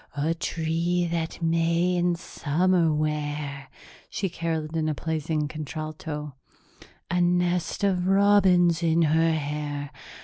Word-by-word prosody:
'A 155 +3 +1
tree 170 +1 -1
that 165 0 -3
may 165 +2 +2
in 175 0 +1
summer 170 +1 +1
wear,'" 150 -2 -2 0.4
she 195 - -2
caroled 160 -2 -3
in 155 -1 0
a 155 - -1
pleasing 155 -1 -2
contralto, 155 0 -6 0.8
"'a 180 0 +2
nest 175 0 +1
of 185 -2 +1
robins 190 -4 +4
in 165 0 +3
her 160 +1 +3
hair.' 145 -1 -3
165 Hz, 115 wpm, -26 LUFS, 150-175 Hz, 0.8 s, robins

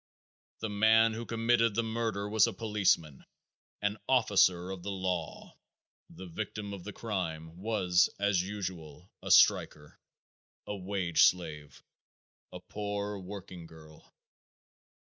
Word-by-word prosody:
The 110 - -2
man 110 +2 +4
who 115 +1 -6
committed 115 -1 +2
the 115 - +1
murder 110 -3 -2
was 105 -1 +4
a - - -3
policeman, 100 - 0 0.6
an 105 +1 -1
officer 95 -7 +3
of 95 -2 -7
the 100 - -6
law; 95 -4 -4 0.5
the 95 - -11
victim 100 +3 -6
of 95 -3 -8
the 105 - -7
crime 85 -8 -4
was 95 -3 +2
as 100 -3 +2
usual 90 -4 -7
a - - -7
striker, 75 -1 +3 0.7
a 105 - -4
wage 90 -4 -1
slave, 75 -5 -2 0.7
a - - -8
poor 105 -1 -4
working 95 -3 -9
girl. 80 -1 -16
100 Hz, 120 wpm, -30 LUFS, 90-105 Hz, 0.7 s, man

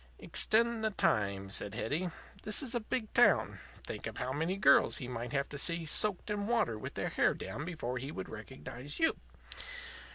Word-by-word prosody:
"Extend 230 0 +2
the 220 - +3
time," 100 - 0
said 100 0 -1
Hetty. 165 +10 -1 0.3
"This 215 +7 0
is 255 -2 -3
a 240 - +2
big 220 0 -3
town. - - +4 0.3
Think - - -5
of - - -7
how 130 - -2
many 165 +6 -1
girls 195 - +5
he 125 - -5
might 120 -1 -5
have 140 -1 0
to 145 - -4
see 170 +1 +1
soaked 205 +5 +1
in 205 0 -1
water 225 - +2
with 105 - -7
their - - -1
hair - - +2
down 150 - -5
before 125 -8 -3
he 135 +4 -5
would 95 - -5
recognize 125 - -7
you. 325 - +4
160 Hz, 190 wpm, -33 LUFS, -, 0.3 s, girls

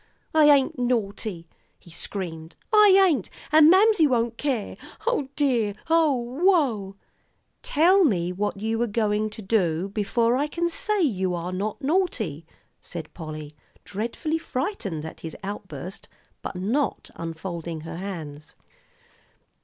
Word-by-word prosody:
"I 310 -1 +6
ain't 280 -3 +4
naughty," 215 -7 -2 0.3
he 170 - -17
screamed. 165 -2 -5 0.2
"I 400 -2 +7
ain't, 275 - 0 0.2
and 310 0 +8
Mamsie 380 -2 +5
won't 235 -3 0
care. 255 -5 -2 0.3
O 380 - 0
dear 240 -8 +1 0.2
ooh 280 -4 +2
ooh!" 225 - +1 0.7
"Tell 365 +6 +4
me 180 - +1
what 205 +2 -2
you 225 +2 -1
were 240 - +1
going 215 -1 0
to 215 0 -8
do, 190 -3 +1
before 230 +4 +1
I 285 +3 +1
can 340 +3 -1
say 420 +3 0
you 190 - 0
are 175 +1 -4
not 205 +6 -3
naughty," 250 - -1 0.3
said 170 -2 -7
Polly, 155 -2 -8 0.3
dreadfully 240 - -3
frightened 255 - -3
at 160 - -8
his 160 - -7
outburst, 190 -4 -7 0.3
but - - -6
not 230 +10 -1
unfolding 165 0 -5
her 165 +1 -7
hands. 160 -5 -7
215 Hz, 130 wpm, -25 LUFS, 180-290 Hz, 0.7 s, and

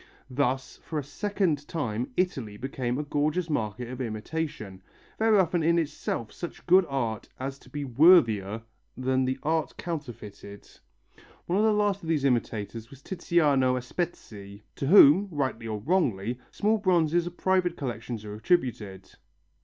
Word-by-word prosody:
Thus 130 0 -1
for 160 - -6
a 150 - -1
second 165 -1 -1
time 125 -7 -3
Italy 130 - -1
became 125 0 -3
a 150 - -2
gorgeous 155 +4 -1
market 115 -2 -2
of 130 +2 -6
imitation, 110 -3 -4 0.4
very 220 -1 +4
often 175 -2 +2
in 170 +2 +3
itself 145 -8 -2
such 175 - -8
good 185 0 +5
art 120 -6 -2
as 135 +1 -5
to - - -18
be 145 -1 -4
worthier 115 - +4 0.3
than 130 0 +1
the 130 0 -1
art 160 +1 -1
counterfeited. 115 - -7 0.8
One 180 +3 0
of 215 - +3
the 220 - +4
last 205 -2 +1
of 165 - -7
these 150 -4 +1
imitators 115 -3 -1
was 140 -1 -15
Tiziano 145 -8 +2
Aspetti, 110 - -6
to 135 - -2
whom, 185 +2 +7
rightly 130 -8 -2
or 110 -1 -3
wrongly, 120 - 0
small 215 +1 +1
bronzes 175 -3 +2
of 175 - -8
private 185 -2 +1
collections 115 -4 -5
are 105 - -6
attributed. 110 - -1
140 Hz, 150 wpm, -27 LUFS, 115-170 Hz, 0.8 s, whom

